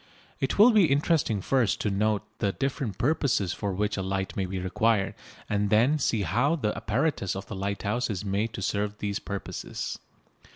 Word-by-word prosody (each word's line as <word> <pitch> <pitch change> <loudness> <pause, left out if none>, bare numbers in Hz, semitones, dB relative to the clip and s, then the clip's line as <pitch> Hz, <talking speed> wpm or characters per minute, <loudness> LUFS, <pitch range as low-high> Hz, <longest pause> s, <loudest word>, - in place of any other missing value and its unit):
It - - -1
will 220 +5 +8
be 210 -5 +6
interesting 140 - +2
first 120 -2 +1
to 105 - 0
note 105 +1 +1 0.2
the 100 -3 +1
different 135 - -2
purposes 130 - +1
for 100 - -3
which 105 +3 -1
a - - -1
light 95 0 -2
may 95 -2 -1
be 95 +1 -4
required, 95 +3 +1 0.3
and 105 0 0
then 125 +9 +4
see 115 -6 +1
how 120 - +2
the 110 -9 -1
apparatus 115 - 0
of 95 - -5
the 110 - -7
lighthouse 100 +5 -1
is 100 -2 -3
made 100 +3 0
to 100 - -5
serve 105 +1 -1
these 100 -1 -2
purposes. 100 -1 -5
105 Hz, 180 wpm, -27 LUFS, 100-125 Hz, 0.3 s, will